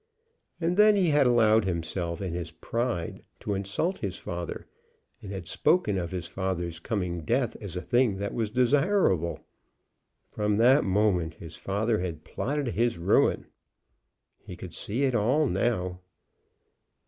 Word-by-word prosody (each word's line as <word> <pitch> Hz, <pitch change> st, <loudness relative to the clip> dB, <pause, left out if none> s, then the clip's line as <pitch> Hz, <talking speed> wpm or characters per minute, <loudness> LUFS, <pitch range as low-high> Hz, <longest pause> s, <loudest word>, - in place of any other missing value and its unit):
And 175 Hz, +2 st, 0 dB
then 210 Hz, 0 st, +7 dB
he 185 Hz, -4 st, +3 dB
had 145 Hz, -3 st, +4 dB
allowed 110 Hz, -3 st, +4 dB
himself, 85 Hz, 0 st, -3 dB
in 90 Hz, -3 st, -3 dB
his 85 Hz, -2 st, -4 dB
pride, 115 Hz, -8 st, -3 dB, 0.2 s
to 105 Hz, -, -3 dB
insult 100 Hz, -, -2 dB
his 100 Hz, -3 st, -4 dB
father, 85 Hz, -1 st, -5 dB, 0.6 s
and 100 Hz, -, -8 dB
had 95 Hz, -4 st, -6 dB
spoken 105 Hz, -, +2 dB
of 85 Hz, -2 st, -3 dB
his 90 Hz, -2 st, -4 dB
father's 90 Hz, -3 st, -3 dB
coming 90 Hz, -3 st, -2 dB
death 120 Hz, -, 0 dB
as 100 Hz, -5 st, -6 dB
a 90 Hz, -, -4 dB
thing 120 Hz, -5 st, +2 dB
that 100 Hz, +1 st, -3 dB
was 115 Hz, -3 st, -1 dB
desirable! 125 Hz, -, +2 dB, 0.9 s
From 105 Hz, -1 st, 0 dB
that 130 Hz, +6 st, +5 dB
moment 95 Hz, -5 st, +1 dB
his 85 Hz, 0 st, -10 dB
father 110 Hz, +3 st, -1 dB
had 85 Hz, -4 st, -4 dB
plotted 140 Hz, -, -2 dB
his 115 Hz, -2 st, 0 dB
ruin. 85 Hz, -, +2 dB, 0.9 s
He -, -, -10 dB
could -, -, -9 dB
see 120 Hz, +7 st, -2 dB
it 135 Hz, -2 st, +2 dB
all 125 Hz, +8 st, +2 dB
now. 90 Hz, -5 st, -1 dB
105 Hz, 150 wpm, -27 LUFS, 90-125 Hz, 0.9 s, then